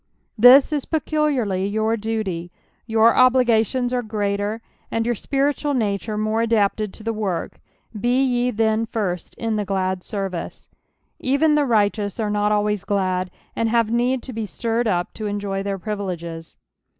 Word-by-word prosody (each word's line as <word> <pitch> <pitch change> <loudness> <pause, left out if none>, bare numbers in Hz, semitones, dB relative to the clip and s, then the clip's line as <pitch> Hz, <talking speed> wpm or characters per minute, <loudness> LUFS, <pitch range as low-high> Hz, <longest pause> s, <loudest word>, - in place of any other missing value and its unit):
This 250 +6 +7
is 290 -3 -1
pecu 310 -1 -2
liarly 210 -10 0
jour 220 +1 +1
duty, 205 -6 -3 0.4
your 225 0 +4
obligations 250 -1 +3
are 250 - +1
^rAfer, 210 0 -2 0.3
and 225 0 -1
your 240 - +1
spiritual 285 +4 -1
nature 210 -2 -1
more 215 +1 0
mdapted 215 -2 +1
to 220 - -12
the 225 +1 -1
work, 200 -5 -3 0.3
be 240 +4 +1
ye 245 -1 +1
then 220 -1 +1
first 195 -7 -3
in 225 -2 -2
the 210 - 0
glad 190 -1 -1
service. 195 -3 -5 0.5
Even 285 +4 +2
the 295 -1 +3
righteous 205 -3 +1
aro 215 -2 -1
not 210 0 +1
alivajs 210 -2 +1
glad, 185 -2 -1 0.3
and 230 0 0
have 230 -1 +2
need 245 +2 +1
to 255 - -8
be 220 -1 -3
stirred 230 +3 -1
up 175 -4 -1
to 215 - -5
enjoy 200 -1 -2
their 195 0 -3
privileges. 175 -4 -5
220 Hz, 160 wpm, -22 LUFS, 200-240 Hz, 0.5 s, This